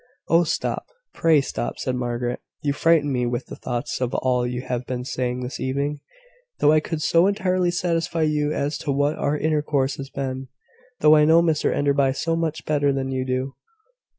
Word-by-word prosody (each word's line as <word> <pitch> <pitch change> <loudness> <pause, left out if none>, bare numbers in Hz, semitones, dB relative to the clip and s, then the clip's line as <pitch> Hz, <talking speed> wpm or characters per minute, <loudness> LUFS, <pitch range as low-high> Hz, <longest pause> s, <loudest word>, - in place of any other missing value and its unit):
"Oh, 165 +1 +5
stop; 160 - -2 0.3
pray 160 -3 +4
stop," 120 -3 -4
said 130 - -2
Margaret. 120 0 -2 0.2
"You 145 -1 +1
frighten 150 -1 +3
me 125 -1 0
with 120 +1 -2
the - - -9
thoughts 120 +2 -4
of 125 -1 -1
all 125 -1 +1
you 125 0 -4
have 125 -1 -3
been 125 -1 -3
saying 125 -1 -2
this 125 - -5
evening, 140 +3 -2 0.6
though 150 - +4
I 155 - +5
could 155 0 -4
so 170 +4 +4
entirely 185 -3 +1
satisfy 170 -1 0
you 150 -1 +1
as 145 0 -2
to 145 - -2
what 145 +2 +1
our 150 +1 0
intercourse 145 -3 0
has 135 -1 -7
been 130 -1 -4 0.5
though 155 0 +7
I 150 0 +5
know 165 +2 +5
Mr 160 -3 +1
Enderby 140 -2 +2
so 165 +4 -1
much 160 -2 -2
better 145 -2 +2
than 135 -1 -2
you 130 -1 -1
do. 130 +1 -2
145 Hz, 190 wpm, -23 LUFS, 130-155 Hz, 0.6 s, though